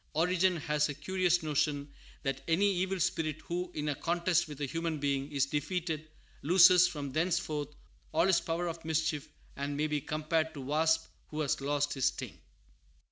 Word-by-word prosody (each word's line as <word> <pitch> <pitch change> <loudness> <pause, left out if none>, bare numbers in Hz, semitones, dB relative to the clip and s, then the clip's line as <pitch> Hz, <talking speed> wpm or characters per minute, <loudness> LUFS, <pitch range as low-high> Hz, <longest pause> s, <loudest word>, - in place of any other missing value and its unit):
Origen 180 +2 +2
has 150 -1 0
a 145 - -4
curious 180 +2 +1
notion 145 -1 -1 0.3
that 135 -2 -2
any 170 +5 +3
evil 190 +1 -1
spirit 155 -2 0
who, 180 +1 -4
in 150 0 -2
a 145 - +1
contest 170 +3 +1
with 150 -2 -9
a 145 - -1
human 165 +3 -2
being, 140 0 -1
is 140 -2 +2
defeated, 155 +2 -3 0.3
loses 180 +2 +7
from 145 -5 -5
thenceforth 155 -2 -1 0.4
all 165 +2 +3
his 190 -3 +4
power 170 +1 -2
of 165 0 -5
mischief, 160 -2 -1 0.3
and 140 +1 -3
may 150 - +1
be 150 -1 -1
compared 155 +2 -1
to 140 - -6
a - - -9
wasp 160 +3 +2 0.2
who 155 0 -4
has 140 -2 0
lost 145 +1 0
his 135 -2 -1
sting. - - -2
155 Hz, 180 wpm, -31 LUFS, 145-170 Hz, 0.4 s, loses